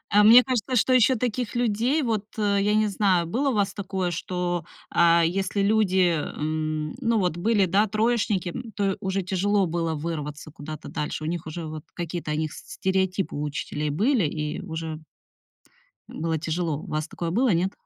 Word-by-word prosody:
А 210 - +7
мне 235 +4 +9
кажется, 255 -1 -1
что 255 +3 +3
ещё 255 +1 +5
таких 245 0 -2
людей, 240 +6 +1
вот, 220 -4 -1
э, 205 -1 +2
я 210 +1 +2
не 215 0 +3
знаю, 190 -4 +2
было 260 - 0
у - - 0
вас 200 -1 +1
такое, 190 -3 -2
что, 175 0 -2 0.3
а, 170 0 +5
если 195 +3 -1
люди, 190 -4 +3
м, 155 0 -3
ну, 230 -2 +2
вот 180 -3 0
были, 205 +1 +2
да, 200 +5 +2
троечники, 215 -4 +1
м, 230 +4 -7
то 195 -2 0
уже 190 0 -1
тяжело 195 +1 +1
было 165 -1 -1
вырваться 150 -1 -5
куда-то 155 0 -8
дальше? 150 +1 -4
У - - -3
них 165 -1 -3
уже 160 +1 -5
вот 155 -1 -7
какие-то 170 -2 -4
о - - 0
них 155 -1 -2
с - - -11
стереотипы 190 0 0
у 145 - -3
учителей 150 0 -3
были, 215 - +2
и 150 0 -3
уже 160 -1 -5 1.1
м, - - -8
было 165 -1 0
тяжело. 160 -1 -2
У - - -10
вас 155 +1 -2
такое 170 0 -4
было, 245 +6 +2
нет? 180 +3 +1
185 Hz, 190 wpm, -25 LUFS, 160-210 Hz, 1.1 s, мне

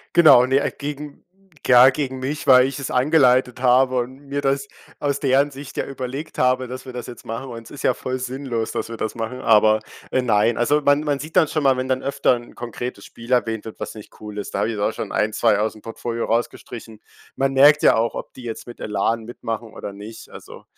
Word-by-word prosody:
Genau, 155 -7 +8
ne, 135 +2 +2
äh, - - -1
gegen 145 0 -7 0.4
ja 125 +1 +8
gegen 130 -1 -3
mich, 145 +3 -4
weil 130 -1 +7
ich 135 +1 -5
es 140 - -4
eingeleitet 130 -2 +3
habe 130 0 +4
und 130 +3 -6
mir 140 +1 -2
das 140 0 0 0.3
aus 140 -1 -1
deren 140 +1 +2
Sicht 140 0 -10
ja - - -1
überlegt 135 +2 -6
habe, 130 0 +2
dass 130 +1 -8
wir - - -6
das 125 -2 -6
jetzt 120 - -10
machen, 115 +4 -5
und 115 -1 -7
es - - -14
ist 145 - -9
ja - - +3
voll 130 0 -4
sinnlos, 125 -3 -3
dass - - -3
wir 115 - -6
das 110 - -3
machen, 115 +2 -5
aber, 110 -2 +4 0.3
äh, 130 - +1
nein. 110 -1 +2
Also 145 +5 +2
man 145 +1 +3
man 145 -2 -1
sieht 155 +2 -9
dann 160 - +5
schon 155 +1 -2
mal, 135 -2 +4
wenn 130 0 -2
dann 130 0 0
öfter 140 -2 +2
'n 120 0 -11
konkretes 120 +1 -6
Spiel 115 +2 -11
erwähnt 115 -3 +1
wird, 110 - -10
was - - -5
nicht 105 - -12
cool 105 -1 -9
ist, 100 - -7
da - - 0
habe 115 - 0
ich 110 - -5
auch 100 - +1
schon - - -6
1, 110 +1 +1
2 105 - +2
ausm 110 0 -2
Portfolio 115 +1 -4
rausgestrichen. 115 -1 -4 0.4
Man 135 0 +1
merkt 145 +3 +6
ja - - +6
auch, 115 +1 0
ob - - -7
die 125 - -12
jetzt 115 -2 -6
mit 120 - -11
Elan 110 +2 -1
mitmachen 115 -1 -6
oder 100 - -7
nicht. 105 +3 -11
Also, - - -12
125 Hz, 235 wpm, -21 LUFS, 115-135 Hz, 0.4 s, Genau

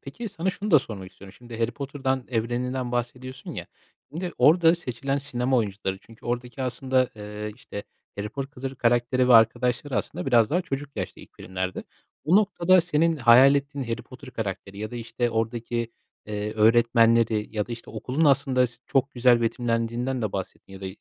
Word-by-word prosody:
Peki, 215 +12 -7
sana 190 -1 -2
şunu 200 +3 -5
da 155 - +8
sormak 100 -7 -8
istiyorum. 95 +1 -13
Şimdi, 120 -2 -10
Harry 115 0 +1
Potter'dan, 135 -1 -3
evreninden 125 +2 -2
bahsediyorsun, 130 +2 -4
ya, - - -6 0.4
şimdi 175 +3 -4
orada 165 +5 +6
seçilen 135 -3 -3
sinema 130 -2 -1
oyuncuları, 100 -3 -2
çünkü 115 +2 -16
oradaki 120 +1 -3
aslında, 130 0 +1
eee, 105 0 -6
işte, 100 - -8 0.4
Harry 105 +1 -3
Porkılır 135 +1 -6
karakteri 120 +1 +2
ve 125 - +7
arkadaşları 120 +4 +3
aslında - - -3
biraz 120 -4 +4
daha 175 +4 +2
çocuk 140 -4 -5
yaşta 95 -3 -5
ilk - - -17
filmlerde. 95 -1 -4 0.4
Bu 175 +5 +4
noktada, 185 -3 +4
senin 165 -1 +1
hayal 130 +2 +7
ettiğin 140 -1 -2
Harry 115 -1 -3
Potter 130 0 -12
karakteri 100 -2 -5
ya 110 0 -4
da, 120 - -6
işte, 120 +1 -2
oradaki, 115 +1 -2 0.3
eee, 105 0 -3
öğretmenleri 115 -1 +4
ya 105 - 0
da, 120 - -6
işte, 115 - -8
okulun 130 +8 -1
aslında, 135 -3 +3
s 120 0 -13
çok 135 0 +1
güzel 120 -1 +4
betimlendiğinden 115 +2 -1
de 105 - -2
bahsettin 95 0 -6
ya 95 - -10
da 95 - -5
120 Hz, 175 wpm, -25 LUFS, 115-135 Hz, 0.4 s, da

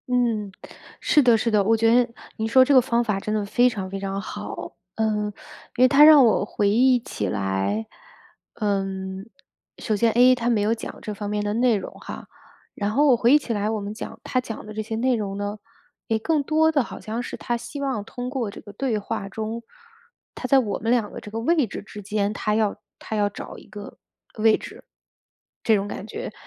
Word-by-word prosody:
嗯， 230 -5 0 0.5
是 300 - +4
的 240 -4 +5
是 230 +1 0
的， 210 -2 +3
我 225 +3 +3
觉 225 +1 +4
得 245 0 +3 0.3
你 220 - -1
说 260 +3 +6
这 285 - +3
个 260 - +8
方 235 0 +1
法 210 -4 -1
真 215 +2 -3
的 210 -1 -1
非 245 +5 +3
常 195 -6 -5
非 195 +1 -5
常 195 0 -3
好。 200 - -7 0.2
嗯， 215 -1 0 0.5
因 250 - +5
为 - - +8
他 280 +3 +6
让 300 -4 +9
我 220 - +3
回 205 0 0
忆 250 +4 +4
起 105 - -4
来 95 - -1 0.7
嗯， 195 -1 -3 0.5
首 215 - -1
先 225 +2 +2
A， 250 +3 +6
他 240 -1 -1
没 225 -3 +2
有 210 +2 +2
讲 230 - -7
这 210 - -5
方 205 0 -5
面 210 0 -1
的 205 0 -1
内 240 0 +3
容 195 - -7
哈， - - -9 0.5
然 205 0 -2
后 290 +7 +3
我 260 - +6
回 235 +2 +3
忆 - - +8
起 260 -5 -3
来 210 0 -1
我 220 -1 -1
们 200 +1 -5
讲 225 +1 -8
他 255 - 0
讲 225 -3 -7
的 215 - -8
这 215 - -3
些 220 +1 -5
内 250 +3 +2
容 200 -3 -3
呢， 205 +1 -4 0.5
也 220 -1 +1
更 305 +5 +1
多 315 +2 +3
的 285 -4 +2
好 - - -9
像 225 +2 -4
是 - - -6
他 240 - -2
希 235 +4 -7
望 265 -7 -2
通 245 +3 -6
过 250 -6 -3
这 - - -10
个 205 - -12
对 255 -3 -1
话 195 -1 -4
中， 220 +3 -5 0.7
他 255 - -4
在 270 +1 +5
我 215 -6 -2
们 225 +2 -1
2 235 -4 +1
个 - - -7
这 210 - -10
个 225 - -3
位 305 +4 +2
置 - - -7
之 210 0 -10
间， 205 +1 -1
他 210 0 -1
要 215 -2 +1 0.2
他 220 - -5
要 205 -1 +2
找 - - -9
一 - - -14
个 205 -1 -10 0.4
位 220 0 +5
置。 - - -11 0.8
这 220 - +4
种 200 0 -1
感 205 - -6
觉 - - -6
220 Hz, 240 characters per minute, -24 LUFS, 205-245 Hz, 0.8 s, 让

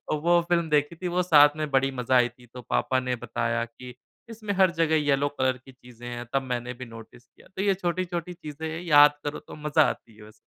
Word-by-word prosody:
वो 170 +3 +3
फ़िल्म 170 -2 +1
देखी 150 +2 +1
थी, 180 +1 -4
वो 180 +1 0
साथ 150 -4 +5
में 155 -1 -3
बड़ी 135 0 +2
मज़ा 130 0 0
आई 120 -1 +4
थी। 120 +1 -20
तो 125 - -8
पापा - - +1
ने 125 -1 -2
बताया 115 0 -2
कि 125 +2 -12 0.3
इसमें 215 -3 -5
हर 190 -2 +4
जगह 165 -2 +1
येल्लो 145 -1 +1
कलर 130 -1 +1
की 135 - -14
चीज़ें 125 -1 -14
हैं, 120 0 -6
तब 135 0 +1
मैंने 125 -1 -4
भी 125 +1 -8
नोटिस 115 +2 -13
किया। - - -22
तो 190 - -2
ये 200 -1 +2
छोटी-छोटी 180 -1 -3
चीज़ें 155 0 -7
हैं, 165 +2 -5
याद 145 -3 +6
करो 145 - -4
तो - - -12
मज़ा 150 +1 +2
आती 110 - -9
है 110 - -15
बस। 110 0 -21
145 Hz, 235 wpm, -26 LUFS, 125-170 Hz, 0.3 s, याद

